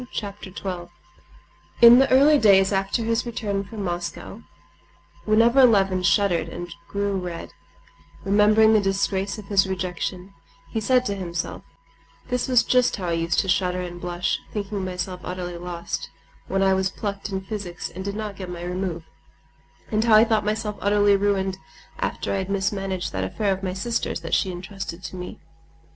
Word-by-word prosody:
Chapter 200 -2 -6
12 180 -2 -6 0.9
In 235 +1 +10
the 270 - +4
early 285 +3 +6
days 195 -3 +5
after 195 +4 0
his 230 +1 0
return 205 -4 -3
from 205 +1 -7
Moscow, 175 +4 -5 0.8
whenever 230 +5 +5
Levin 195 -6 +4
shuddered 175 -2 +2
and 175 +1 -7
grew 200 0 -1
red, 175 -2 -6 0.7
remembering 210 +2 +5
the 215 - +5
disgrace 195 0 -1
of 210 - -9
his 195 -1 +2
rejection, 185 +1 -4 0.4
he 220 - -2
said 250 +3 +3
to 200 - -1
himself: 170 -3 -4 0.7
"This 250 +1 -1
was 250 -2 +4
just 250 -1 +3
how 185 -4 -4
I - - 0
used 165 0 +1
to 195 - -6
shudder 180 -1 +1
and 175 -1 -7
blush, 175 0 -1
thinking 200 -1 -3
myself 180 0 -4
utterly 180 -1 -5
lost, 175 -1 -5 0.4
when 195 0 +1
I 190 0 +4
was 190 0 +1
plucked 200 0 -5
in 190 -1 -3
physics 190 -3 -6
and 190 - -7
did 200 +1 -4
not 210 -2 -4
get 185 -2 -7
my 175 -1 -6
remove; 180 -1 -3 0.9
and 215 0 +2
how 225 -2 +5
I 215 - +8
thought 220 -2 +1
myself 210 0 -2
utterly 205 0 +4
ruined 195 -1 0 0.4
after - - -2
I - - 0
had 190 0 -3
mismanaged 195 -2 -2
that 95 0 -1
affair 195 - 0
of 190 - -6
my 185 -2 -3
sister's 195 -2 -2
that 165 - -6
was - - +3
entrusted 185 0 -7
to - - -7
me. 180 0 -7
195 Hz, 170 wpm, -24 LUFS, 180-210 Hz, 0.9 s, In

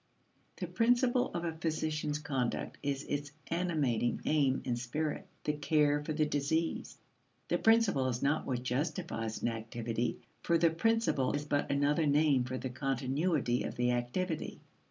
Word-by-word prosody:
The - - -3
principle 245 +1 +2
of 175 - -2
a 165 - -1
physician's 155 -2 -1
conduct 135 -5 -2
is 140 0 -2
its 145 0 -3 0.2
animating 150 -10 +1
aim 140 -4 +2
and 120 -1 -1
spirit 145 +5 -3 0.2
the 150 - 0
care 150 0 +2
for 155 - -4
the 155 0 +2
diseased. 150 +3 -1 0.5
The - - +1
principle 225 - +4
is 125 0 -2
not 145 +3 +1
what 125 -2 -2
justifies 125 -4 -2
an - - +2
activity, 115 +1 -3 0.2
for 170 - +2
the 165 0 +4
principle 200 - +1
is 145 0 -2
but 145 -1 0
another 145 +3 +2
name 145 -3 +3
for 130 +1 -3
the 130 0 -4
continuity 135 +1 0
of - - -4
the 125 0 +2
activity. 150 +8 -2
145 Hz, 155 wpm, -32 LUFS, 130-160 Hz, 0.5 s, principle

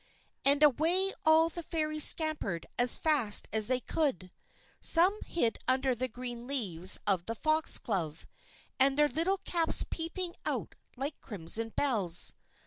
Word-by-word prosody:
_" - - -34 0.5
And 285 +1 0
away 335 +7 +2
all 320 +1 +4
the 345 - -7
Fairies 310 -2 +1
scampered 305 - +1
as 245 0 +3
fast 280 -10 +2
as 215 -1 +2
they 255 0 0
could. 255 - -3 0.5
Some 370 +5 +5
hid 235 -10 -1
under 260 0 0
the 250 +2 -4
green 245 0 -9
leaves 190 -10 +1
of 185 -4 -1
the 230 - -4
Foxglove, 210 - 0 0.5
their 275 +3 +2
little 330 +8 -1
caps 335 -2 +1
peeping 340 +2 -5
out - - -4 0.2
like 280 +3 -6
crimson 215 +2 -1
bells. 210 -10 +1
270 Hz, 135 wpm, -29 LUFS, 220-315 Hz, 0.5 s, Some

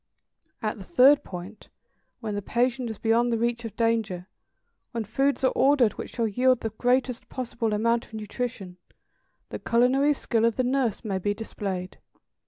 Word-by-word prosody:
At - - -2
the - - -8
third 290 -3 +5
point, 185 +4 -9 0.5
when 220 -3 -3
the 205 - -2
patient 245 +3 0
is 220 - -6
beyond 235 +2 +2
the 230 - +1
reach 235 +1 -1
of 220 -2 -7
danger, 220 -6 0 0.7
when 230 -1 -2
foods 270 +7 0
are 260 - +4
ordered 265 -5 +4
which - - -8
shall 230 -2 +1
yield 250 +4 +2
the 225 - -3
greatest 250 +2 0
possible 235 -3 -3
amount 230 +3 +1
of 220 - -12
nutrition, 210 -3 -5 0.7
the - - -5
culinary 265 +5 +3
skill 230 -4 0
of 230 -2 +2
the 255 - +1
nurse 250 -4 0
may 195 -3 -1
be 205 +2 -1
displayed. 195 -4 -5
230 Hz, 170 wpm, -26 LUFS, 210-250 Hz, 0.7 s, third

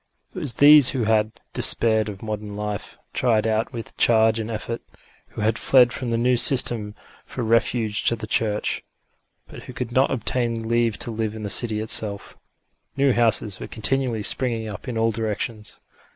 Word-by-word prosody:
It 185 - -6
was 145 -9 -3
these 145 -1 +7
who 130 -3 -2
had 110 0 +1 0.2
despaired 110 -2 +3
of 100 0 -10
modern 105 -1 -6
life, 105 0 -6 0.2
tired 115 -4 +1
out 110 0 -1
with 115 -2 -8
change 110 -1 +3
and 110 0 -5
effort, 115 +1 -5 0.5
who - - -9
had 105 0 0
fled 125 -1 +4
from 125 -3 -5
the 115 - 0
new 125 +1 +2
system 120 -4 +2 0.3
for 125 - -6
refuge 115 -1 0
to 115 - +2
the 110 - -7
Church, 105 -1 -1 0.6
but - - -12
who 125 - -10
could 120 -1 -5
not 130 +2 +2
obtain 115 -3 -2
leave 115 -1 0
to 120 - -1
live 110 -1 -3
in 110 - -8
the 100 - -3
city 110 -2 +3
itself. 105 -2 0 0.6
New 140 -1 +3
houses 110 -4 +1
were - - -7
continually 120 -1 -1
springing 115 -3 -1
up 100 - -11
in 120 -2 -4
all 115 0 +1
directions. 110 0 -4
115 Hz, 180 wpm, -22 LUFS, 110-120 Hz, 0.6 s, these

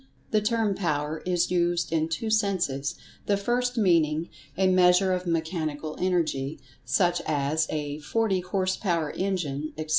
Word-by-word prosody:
The 215 - +3
term 220 -1 +1
"Power" 155 -4 -2
is 180 -1 +1
used 175 -1 +1
in 160 0 +1
two 220 +7 -2
senses, 185 -10 0 0.3
the 200 - +3
first 245 +4 0
meaning 165 -5 +2 0.3
"a 190 - +3
measure 185 0 +4
of 180 0 -3
Mechanical 160 -2 -2
Energy," 160 -6 0 0.2
such 175 +8 +2
as 150 +1 +1
a 150 -1 -3
"forty 195 +5 0
horse 185 +1 -1
power 170 -6 -1
engine," 155 -6 -2
etc. 155 0 -5
175 Hz, 145 wpm, -26 LUFS, 155-190 Hz, 0.3 s, measure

